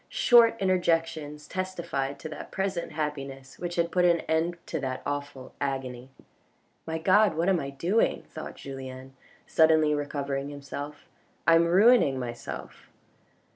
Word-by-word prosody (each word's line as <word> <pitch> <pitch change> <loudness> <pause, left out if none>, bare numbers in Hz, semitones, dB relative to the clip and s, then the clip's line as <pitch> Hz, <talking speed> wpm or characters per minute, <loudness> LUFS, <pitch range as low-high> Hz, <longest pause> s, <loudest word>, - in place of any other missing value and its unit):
Short 230 -2 +5
interjections 165 -5 0
testified 170 -7 -3
to 155 - -7
that 155 - -8
present 190 -4 -3
happiness 135 -3 -5
which 175 -1 -4
had 170 0 0
put 180 - +2
an 170 -2 +4
end 165 +2 0
to 160 - -3
that 130 -2 -4
awful 145 -2 -5
agony. 130 -2 -3 0.4
" - - -41
My 160 0 -2
God, 190 +2 +4
what 170 +3 +2
am 185 -3 +3
I 140 - -4
doing? 170 +11 +1
" - - -32
thought - - -7
Julien, 130 -1 -8 0.3
suddenly 160 -1 +4
recovering 140 -1 -2
himself. 145 +1 -7 0.2
" - - -38
I 165 - +7
am 165 +1 +5
ruining 190 - +5
myself." 120 - -7
150 Hz, 150 wpm, -27 LUFS, 135-175 Hz, 0.4 s, I